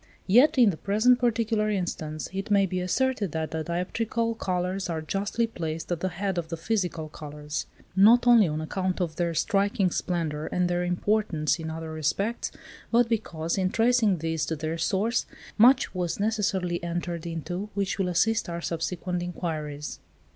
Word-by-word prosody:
Yet, 250 +10 +5
in 235 -5 +6
the 160 - -7
present 220 +7 +3
particular 225 -3 +1
instance, 160 -6 -3
it 195 +3 -4
may 200 -1 +4
be 185 -1 -2
asserted 210 - 0
that 160 -1 -2
the 160 -1 -2
dioptrical 225 +7 -1
colours 185 +1 -1
are 165 -1 -1
justly 200 +7 -1
placed 165 -7 -5
at 175 - 0
the 185 - -1
head 190 +1 -2
of 165 - -5
the 165 0 -4
physical 175 -4 -1
colours; 150 0 -6 0.3
not 225 +6 +6
only 235 -5 +7
on 155 0 -2
account 185 +3 -2
of 170 -3 -2
their 170 -1 0
striking 200 -1 +1
splendour 160 -5 -2
and 180 0 +1
their 175 0 0
importance 180 -3 0
in 160 -1 -4
other 160 0 -5
respects, 195 +9 -1 0.4
but 235 0 +3
because, 170 -6 -1
in 185 -1 +2
tracing 225 -3 +3
these 160 -1 -2
to 160 - -1
their 160 +2 -3
source, 210 +8 0 0.3
much 250 +5 +5
was 180 -1 -2
necessarily 195 -5 0
entered 170 -1 -3
into 175 +5 -4
which 200 0 -1
will 185 -2 +1
assist 220 +3 +1
our 170 0 -3
subsequent 175 +2 -3
enquiries. 155 -4 -4
180 Hz, 170 wpm, -27 LUFS, 165-210 Hz, 0.4 s, only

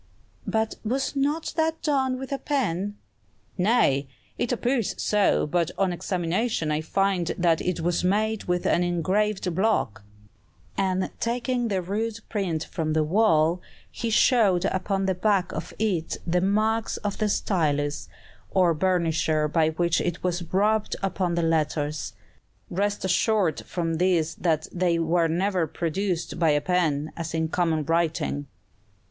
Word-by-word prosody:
"But 220 0 0
was 265 +6 -1
not 290 +4 0
that 320 0 0
done 265 -4 +1
with 265 +1 -7
a 275 - -1
pen?" 205 - -1 0.6
"Nay: 180 - +2 0.3
it 240 - -2
appears 245 -2 0
so, 210 -2 +2
but 170 +1 0
on 190 -2 +1
examination 180 0 -1
I 150 +1 0
find 190 +1 0
that 170 -2 +2
it 180 -2 -2
was 175 +1 0
made 215 +3 +1
with 180 0 -1
an 175 - +3
engraved 185 +2 0
block;" 135 - 0 0.7
and 190 -1 0
taking 245 +1 -1
the 190 -4 -1
rude 215 +4 -2
print 180 -7 -1
from 155 -1 -3
the 155 0 +2
wall, 165 -1 +3 0.3
he 230 - -3
showed 215 -5 +4
upon 195 0 0
the 190 - +2
back 190 0 +1
of - - -5
it 190 -7 -1
the 175 +1 +1
marks 215 +3 +1
of 205 -1 -4
the 215 -1 +1
stylus, 145 -8 0 0.4
or 180 -3 +3
burnisher 160 -3 +1
by 160 +1 +2
which 170 +1 +1
it 175 -1 -3
was 175 -2 -2
rubbed 210 +3 +2
upon 185 -3 0
the 170 - 0
letters. 155 -2 -1 0.6
"Rest 205 +2 -1
assured 190 -3 +1
from 165 -2 -2
this 170 -2 +2
that 160 -2 0
they 175 -1 +1
were 165 +1 +2
never 180 +1 0
produced 175 +2 -2
by 165 -2 +4
a 145 -1 +3
pen, 155 -4 0
as 165 -1 -4
in 160 0 0
common 165 -3 0
writing." 160 -3 0
180 Hz, 145 wpm, -25 LUFS, 165-210 Hz, 0.7 s, showed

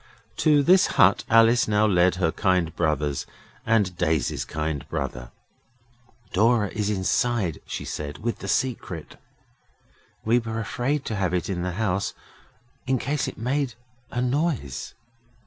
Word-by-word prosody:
To 150 -2 +4
this 180 +5 +5
hut 100 -5 +5
Alice 115 +1 +5
now 105 0 +3
led 90 -3 +3
her 90 -3 +1
kind 90 -4 +1
brothers 75 -4 -1 0.4
and 105 -6 +2
Daisy's 80 -4 0
kind 75 -2 -4
brother. - - -4 1.0
'Dora 110 +1 +3
is 105 -1 -2
inside,' 100 - 0
she - - -5
said, 75 -1 -5
'with 115 +1 -3
the - - -7
Secret. 110 - -2 1.1
We 115 +2 +4
were 115 -1 -4
afraid 130 +6 -2
to 110 - -3
have 95 -3 0
it 90 +2 -2
in 90 -2 -2
the 90 0 -2
house 100 0 -1 0.7
in 130 0 +2
case 145 +4 -1
it - - -6
made 130 +1 -1 0.3
a 125 - -2
noise. 125 - -2
105 Hz, 140 wpm, -25 LUFS, 90-120 Hz, 1.1 s, this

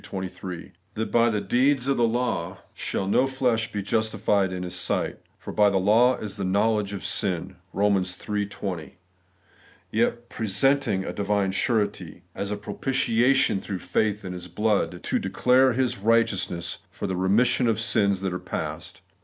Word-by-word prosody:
23); 95 -2 -6 0.2
that 110 +1 -3
'by 120 0 +4
the 105 -2 0
deeds 125 +6 +2
of 140 - +2
the 120 -1 +3
law 100 -7 -1 0.2
shall 95 - -3
no 125 +7 +3
flesh 125 -4 0
be 105 -1 -3
justified 105 -2 +1
in 90 0 -4
His 90 - -6
sight, - - -2 0.2
for - - -8
by 105 -1 +5
the 100 - +1
law 115 +7 +4
is 105 -1 -6
the 100 - -3
know 100 +4 +2
ledge 105 -2 -2
of 100 -2 -6
sin 95 -2 -2
' 90 - -38
(Eom, 100 0 0
iii 105 - 0
20); 95 -6 -6 0.9
yet 120 +2 0
presenting 110 -1 +1
a - - -4
divine 100 -1 0
Surety, 100 -5 -1
' - - -41
as 100 - -2
a 105 - -2
propitiation 120 +1 +1
through 100 - -4
faith 105 +3 -1
in 90 - -4
His 90 0 -7
blood, 90 -2 0
to - - 0
declare 130 +1 +3
His 125 -3 0
righteousness 100 -5 +1
for - - -6
the 95 -2 -2
remission 115 +7 +3
of 110 -2 +1
sins 100 -4 +1
that 95 -2 -2
are 90 - -3
past' - - -6
(Eom. - - -39
105 Hz, 180 wpm, -25 LUFS, 95-115 Hz, 0.9 s, by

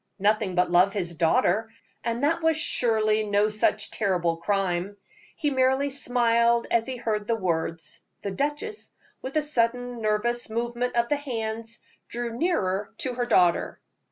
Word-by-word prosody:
Nothing 205 -1 +1
but 180 -1 +2
love 180 +3 +4
his 175 -4 -2
daughter; 180 +6 +2 0.3
and 235 +3 -2
that 330 +3 +2
was 320 -1 +2
surely 220 -7 +2
no 205 0 +2
such 215 0 0
terrible 175 -5 0
crime. 190 +1 -1 0.4
He 295 -3 -1
merely 265 +1 +2
smiled 235 -3 +2
as 230 0 +2
he 260 - -3
heard 215 -3 -2
the 230 - +2
words; 165 -5 -2 0.2
the 200 - -3
duchess, 295 - -3 0.3
with 260 +3 -6
a 305 - +2
sudden 245 -3 0
nervous 220 +3 0
movement 240 +2 -2
of 235 0 +2
the 295 - +2
hands, 230 -4 -4 0.3
drew 235 -1 -4
nearer 210 - 0
to 280 -7 -3
her 245 0 -1
daughter. 180 -7 +2
230 Hz, 155 wpm, -26 LUFS, 200-250 Hz, 0.4 s, love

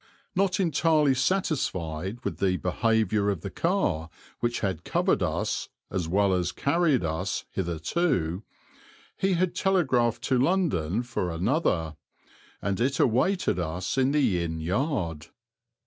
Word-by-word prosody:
Not 190 0 +1
entirely 155 -4 +3
satisfied 120 - -1
with - - -3
the 95 -2 +2
behaviour 110 +2 +1
of 95 -5 -2
the 100 - -6
car 165 - 0 0.3
which 120 0 -1
had 95 -5 -2
covered - - +1
us, - - -1 0.2
as 90 -3 -2
well 100 +3 +2
as 90 -1 0
carried 145 - +2
us, 80 +4 -2
hitherto, 90 - -1 0.7
he 195 0 +1
had 180 0 +1
telegraphed 130 - +1
to 130 -2 +2
London 125 - +1
for 120 -7 -2
another, 85 - 0 0.7
and 100 +2 -1
it 135 +3 +1
awaited 130 - +2
us 90 +2 -2
in 135 0 +2
the 130 -12 +2
inn 80 -1 -3
yard. 85 - -1
110 Hz, 130 wpm, -27 LUFS, -, 0.7 s, entirely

